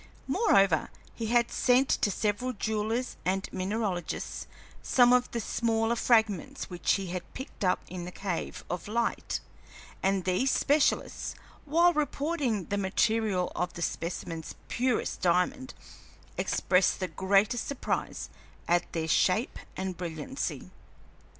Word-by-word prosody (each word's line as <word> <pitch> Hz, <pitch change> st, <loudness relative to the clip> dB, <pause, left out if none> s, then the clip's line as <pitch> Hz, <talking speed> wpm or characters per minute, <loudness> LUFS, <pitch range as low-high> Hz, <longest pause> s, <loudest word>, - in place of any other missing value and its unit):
Moreover, 195 Hz, -, +3 dB, 0.2 s
he 225 Hz, -, -4 dB
had 235 Hz, +1 st, +3 dB
sent 255 Hz, +2 st, +4 dB
to -, -, +2 dB
several 215 Hz, +6 st, -1 dB
jewelers 220 Hz, +3 st, -2 dB
and 190 Hz, +1 st, 0 dB
mineralogists 190 Hz, -2 st, -2 dB, 0.3 s
some 245 Hz, -1 st, +5 dB
of 250 Hz, 0 st, +3 dB
the 235 Hz, -, -3 dB
smaller 225 Hz, +1 st, +1 dB
fragments 220 Hz, -7 st, +1 dB
which 175 Hz, -1 st, +1 dB
he 195 Hz, -, -1 dB
had 180 Hz, -1 st, -6 dB
picked 265 Hz, -5 st, -7 dB
up 180 Hz, -1 st, +2 dB
in 180 Hz, -1 st, -6 dB
the 180 Hz, -, -6 dB
cave 185 Hz, -2 st, -4 dB
of 180 Hz, +1 st, -4 dB
light, 235 Hz, +2 st, -1 dB, 0.6 s
and 195 Hz, -1 st, +1 dB
these 185 Hz, +9 st, +2 dB
specialists, 290 Hz, +2 st, +1 dB, 0.3 s
while 340 Hz, +4 st, +4 dB
reporting 285 Hz, -, 0 dB
the 200 Hz, +3 st, -1 dB
material 200 Hz, -1 st, +1 dB
of 180 Hz, 0 st, -1 dB
the 170 Hz, -, -4 dB
specimens 165 Hz, -1 st, -4 dB
purest 250 Hz, -1 st, 0 dB
diamond, 185 Hz, +10 st, +1 dB, 0.6 s
expressed 185 Hz, 0 st, +2 dB
the 185 Hz, -, -1 dB
greatest 195 Hz, +7 st, +2 dB
surprise 280 Hz, -, -3 dB, 0.4 s
at 175 Hz, 0 st, +2 dB
their 160 Hz, -1 st, -1 dB
shape 185 Hz, -, +2 dB, 0.2 s
and 190 Hz, -2 st, -3 dB
brilliancy. 170 Hz, -, -4 dB
205 Hz, 125 wpm, -29 LUFS, 180-245 Hz, 0.6 s, some